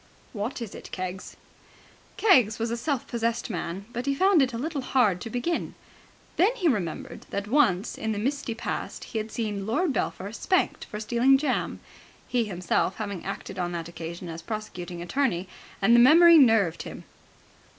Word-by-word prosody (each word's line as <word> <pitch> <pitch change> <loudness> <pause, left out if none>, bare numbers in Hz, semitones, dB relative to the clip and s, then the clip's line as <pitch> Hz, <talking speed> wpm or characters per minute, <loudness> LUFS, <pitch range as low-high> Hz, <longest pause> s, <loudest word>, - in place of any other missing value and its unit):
"What 230 +3 -3
is 215 - -8
it, - - -10
Keggs?" 185 0 -6 0.8
Keggs 255 - +4
was 230 0 -2
a - - 0
self 265 +1 -2
possessed 230 0 -2
man, 180 +1 -4
but 245 +3 -4
he 275 - +2
found 380 +1 +4
it 260 - +2
a 230 - -4
little 290 +3 -3
hard 225 -8 +2
to - - -5
begin. 250 +9 -2 0.6
Then 410 +8 +4
he 380 -8 0
remembered 200 - -2
that 200 +1 -3
once 230 -6 +2
in 220 - -1
the 210 - -2
misty 265 +1 -2
past 230 - -4
he 225 - -4
had 215 +1 -5
seen 205 -3 -3
Lord 285 +7 +1
Belpher 200 -2 -3
spanked 370 +10 0
for 210 - -7
stealing 240 +5 +4
jam, 295 +2 -1 0.5
he 240 -2 +1
himself 185 -1 0
having 200 -5 -5
acted 195 -1 -6
on 175 -1 -2
that 165 -1 -4
occasion 170 +1 -7
as 165 0 -6
prosecuting 180 -3 -6
attorney; 190 -4 0 0.4
and 235 +4 +6
the - - +7
memory 330 +6 +8
nerved 225 - +4
him. - - -8
225 Hz, 175 wpm, -26 LUFS, 190-270 Hz, 0.8 s, memory